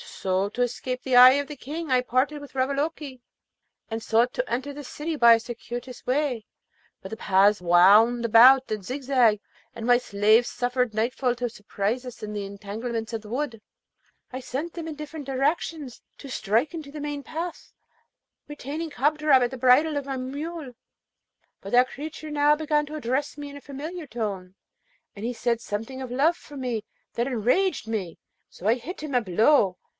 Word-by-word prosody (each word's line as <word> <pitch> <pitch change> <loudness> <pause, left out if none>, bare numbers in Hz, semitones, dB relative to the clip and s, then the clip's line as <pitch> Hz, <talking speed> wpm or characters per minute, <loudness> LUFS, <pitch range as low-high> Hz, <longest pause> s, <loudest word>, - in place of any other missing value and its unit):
So, 190 +1 -2
to 245 - -4
escape 250 +1 -3
the 260 -2 0
eye 250 +1 +10
of 285 0 -1
the 295 - -7
King 300 +3 -6
I 255 -1 +4
parted 260 +4 0
with 285 - -12
Ravaloke, 275 +1 -2 0.7
and 225 0 -4
sought 235 +3 +2
to - - -2
enter 260 +4 -3
the 290 +1 -8
city 305 +4 -5
by 235 -5 +7
a - - -1
circuitous 240 +1 -8
way; 255 -4 -1 0.6
but - - -8
the 220 - -6
paths 200 +1 +3
wound 200 +7 +5
about 255 +4 +7
and 215 -2 -3
zigzagged, 255 -3 +2 0.4
and 230 -1 -6
my 245 0 +5
slaves 215 0 +3
suffered 250 -1 -1
nightfall 245 +3 0
to 245 0 -3
surprise 210 +3 -3
us 250 - -9
in 210 0 -6
the 205 -1 -4
entanglements 220 +3 -5
of 225 - -3
the 210 - -13
wood. 240 -3 -3 0.7
I 255 - -5
sent 290 +7 -5
them 335 -2 -6
in 315 - -5
different 300 0 -8
directions 280 0 -2 0.2
to 275 - -10
strike 235 - 0
into 310 -4 -7
the 300 0 -7
main 290 -1 -4
path, 330 +4 -6 0.8
retaining 295 +2 -6
Kadrab 295 0 +3
at 240 - -1
the 260 - -6
bridle 265 +5 +4
of 285 - -3
my 270 -1 -4
mule; 285 +2 -6 0.9
but 195 - -8
that 250 +1 +4
creature 310 +1 -7
now 295 0 +4
began 300 -1 0
to 305 - -7
address 280 +1 -2
me 290 -1 -7
in 285 - -10
a - - -12
familiar 305 +6 -7
tone, 200 -6 -5 0.6
and 205 +2 -6
he 245 - -2
said 235 -1 -1
something 225 +6 -5
of 260 -2 -6
love 300 +7 +2
for 290 - -12
me 245 -5 -3 0.3
that 235 +2 -1
enraged 270 - +1
me, 200 -7 -4 0.3
so 180 - -13
that 215 - +5
I - - +6
hit 280 +10 -8
him 300 -4 -4
a 245 - +4
blow. 205 - +3
255 Hz, 185 wpm, -25 LUFS, 225-290 Hz, 0.9 s, eye